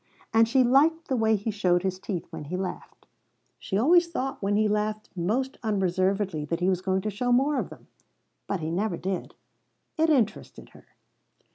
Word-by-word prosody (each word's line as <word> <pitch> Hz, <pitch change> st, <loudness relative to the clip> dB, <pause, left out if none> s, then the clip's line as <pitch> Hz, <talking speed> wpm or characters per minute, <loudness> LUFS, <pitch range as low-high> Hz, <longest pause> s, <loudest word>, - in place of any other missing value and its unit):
And 225 Hz, 0 st, +5 dB
she 260 Hz, +2 st, +4 dB
liked 305 Hz, +7 st, +3 dB
the 265 Hz, -, +1 dB
way 220 Hz, -2 st, +3 dB
he 210 Hz, +2 st, -2 dB
showed 180 Hz, -4 st, +1 dB
his 185 Hz, -1 st, -2 dB
teeth 190 Hz, -3 st, -4 dB
when 160 Hz, -2 st, -7 dB
he 180 Hz, +5 st, -4 dB
laughed. 185 Hz, -1 st, -6 dB, 0.5 s
She 190 Hz, -, -2 dB
always 340 Hz, -, +5 dB
thought 270 Hz, -5 st, -4 dB
when 200 Hz, +1 st, 0 dB
he 215 Hz, +1 st, +3 dB
laughed 210 Hz, +1 st, -2 dB
most 230 Hz, +10 st, -1 dB
unreservedly 190 Hz, -4 st, 0 dB
that 165 Hz, +3 st, -2 dB
he 180 Hz, +1 st, +2 dB
was 185 Hz, -1 st, 0 dB
going 190 Hz, 0 st, 0 dB
to 215 Hz, -, -3 dB
show 245 Hz, +5 st, -1 dB
more 275 Hz, +4 st, +3 dB
of -, -, -4 dB
them; -, -, -13 dB, 0.6 s
but 195 Hz, -4 st, -2 dB
he 155 Hz, +1 st, -3 dB
never 185 Hz, 0 st, -1 dB
did; 190 Hz, 0 st, -4 dB, 0.6 s
it 320 Hz, +1 st, +4 dB
interested 245 Hz, -9 st, -1 dB
her. -, -, -18 dB
205 Hz, 185 wpm, -26 LUFS, 185-245 Hz, 0.6 s, And